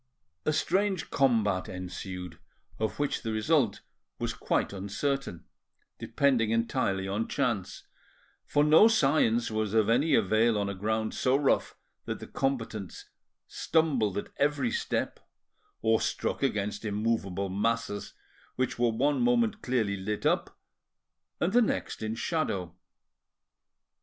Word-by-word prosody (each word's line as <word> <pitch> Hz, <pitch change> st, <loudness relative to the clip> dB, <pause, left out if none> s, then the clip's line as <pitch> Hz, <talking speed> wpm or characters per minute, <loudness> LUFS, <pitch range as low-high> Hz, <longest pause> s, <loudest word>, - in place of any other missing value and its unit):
A -, -, +4 dB
strange 190 Hz, +4 st, 0 dB
combat 110 Hz, -8 st, +2 dB
ensued, 90 Hz, -1 st, -7 dB, 0.4 s
of 110 Hz, 0 st, -2 dB
which 145 Hz, -1 st, -1 dB
the 115 Hz, -, -3 dB
result 115 Hz, 0 st, +1 dB, 0.4 s
was -, -, -2 dB
quite -, -, -1 dB
uncertain, 100 Hz, -, -3 dB, 0.5 s
depending 130 Hz, -6 st, +1 dB
entirely 115 Hz, -4 st, 0 dB
on 105 Hz, +3 st, -1 dB
chance; 115 Hz, -9 st, -2 dB, 0.6 s
for 145 Hz, -, +2 dB
no 155 Hz, +8 st, +7 dB
science 135 Hz, -, +2 dB
was 110 Hz, -1 st, -1 dB
of 110 Hz, -1 st, +3 dB
any 135 Hz, +8 st, +3 dB
avail 110 Hz, +2 st, +3 dB
on 100 Hz, -1 st, -1 dB
a -, -, -3 dB
ground 110 Hz, +3 st, -1 dB
so 130 Hz, +1 st, +2 dB
rough 140 Hz, -1 st, +1 dB, 0.3 s
that -, -, -3 dB
the -, -, -8 dB
combatants 115 Hz, -7 st, -3 dB, 0.4 s
stumbled 135 Hz, -, +1 dB
at 100 Hz, -, -4 dB
every 140 Hz, -4 st, +1 dB
step, -, -, -2 dB, 0.6 s
or 110 Hz, 0 st, +3 dB
struck -, -, -2 dB
against 105 Hz, 0 st, -1 dB
immovable 105 Hz, -3 st, -1 dB
masses, 105 Hz, +1 st, -2 dB, 0.4 s
which 130 Hz, -2 st, -1 dB
were 120 Hz, -1 st, +3 dB
one 140 Hz, -, +1 dB
moment 235 Hz, -3 st, +2 dB
clearly 115 Hz, -6 st, 0 dB
lit 105 Hz, +3 st, -4 dB
up, -, -, 0 dB, 0.8 s
and 175 Hz, +4 st, 0 dB
the 245 Hz, -, +6 dB
next 225 Hz, -, -1 dB
in 110 Hz, 0 st, -2 dB
shadow. 100 Hz, -, -2 dB
115 Hz, 125 wpm, -29 LUFS, 100-140 Hz, 0.8 s, no